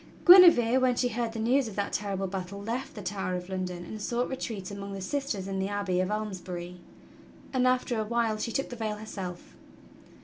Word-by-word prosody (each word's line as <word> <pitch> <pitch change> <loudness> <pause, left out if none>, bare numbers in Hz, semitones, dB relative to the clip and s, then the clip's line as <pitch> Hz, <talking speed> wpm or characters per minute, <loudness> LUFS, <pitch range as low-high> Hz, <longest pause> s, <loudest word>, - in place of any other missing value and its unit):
^ - - -22
Guinevere, 335 -10 +8
when 255 -1 +3
she 245 0 +1
heard 235 0 -2
the - - -6
news 245 +4 +2
of 210 - -8
that 200 -1 -2
terrible 195 -1 -2
battle, 190 +1 -5
left 230 +6 -4
the 210 - -7
Tower 185 -1 -2
of 180 +1 -6
London 180 -2 -4
and 215 - -7
sought 240 +3 -1
retreat 215 -7 -5
among 200 0 -6
the 195 - -5
sisters 205 -2 -3
in 195 -1 -3
the 190 - 0
abbey 200 -3 -1
of 185 +1 0
Almesbury, 185 -4 -4 0.8
and 255 -1 +3
after 250 -2 +1
a - - +1
while 225 0 0
she 230 - -2
took 270 - -2
the 245 - -6
veil 220 -2 -2
herself. 195 -5 -7
210 Hz, 210 wpm, -28 LUFS, 190-240 Hz, 0.8 s, Guinevere